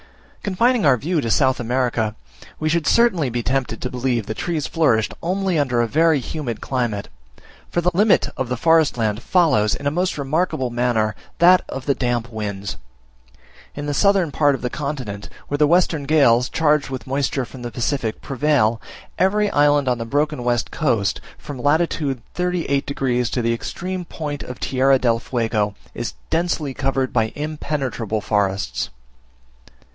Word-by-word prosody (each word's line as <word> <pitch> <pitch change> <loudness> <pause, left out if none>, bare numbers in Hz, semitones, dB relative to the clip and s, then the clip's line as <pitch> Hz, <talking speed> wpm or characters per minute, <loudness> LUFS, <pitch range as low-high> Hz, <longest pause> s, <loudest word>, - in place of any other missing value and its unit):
Confining 230 +4 +2
our 135 -4 +5
view 160 +5 -1
to 115 - -2
South 130 +2 +2
America, 120 -3 0 0.4
we 155 - -1
should 160 -1 +1
certainly 190 - +3
be 120 0 -2
tempted 130 -3 -1
to 125 - -4
believe 125 -3 -1
that 110 - -5
trees 165 -4 -1
flourished 125 -10 +1
only 185 -1 0
under 125 -4 +1
a 120 - +2
very 160 +3 +3
humid 125 -3 -4
climate; 120 -6 -2 0.6
for 175 - 0
the 180 +1 +2
limit 205 +4 +4
of 130 -2 -3
the 125 - -1
forest 160 -1 +3
land 110 -1 0
follows, 150 - +3
in 140 - -9
a 145 - +2
most 180 +2 -1
remarkable 140 -2 -1
manner, 120 -3 +1 0.2
that 180 +2 +6
of 135 -1 -6
the 140 - +3
damp 120 -2 -2
winds. 100 -3 -4 1.0
In 145 - -5
the 145 - -1
southern 195 0 +3
part 145 -1 +3
of 130 - -9
the 125 - -2
continent, 130 -9 -5 0.2
where 145 - -1
the 150 - +5
western 165 -3 +2
gales, 130 -5 +4
charged 150 -3 +2
with 130 -1 -5
moisture 135 -1 -1
from 130 +1 -11
the 120 - -4
Pacific, 120 0 -2
prevail, 135 -5 +1 0.4
every 205 +3 +2
island 145 -1 +3
on 125 -2 +1
the 115 - -3
broken 145 +1 0
west 120 -1 0
coast, 115 -11 0 0.2
from 140 -3 -8
lat. 155 +5 +3
38 145 +2 -2
degs. 125 -4 0
to 125 - -1
the 115 0 +2
extreme 180 +9 -4
point 150 -3 -5
of 125 -4 -8
Tierra 135 +1 +3
del 115 -3 +1
Fuego, 115 -5 -1 0.2
is - - -5 0.2
densely 160 -4 0
covered 135 0 -1
by 115 -2 +1
impenetrable 140 -7 -3
forests. 100 -1 -1
135 Hz, 165 wpm, -21 LUFS, 120-155 Hz, 1.0 s, that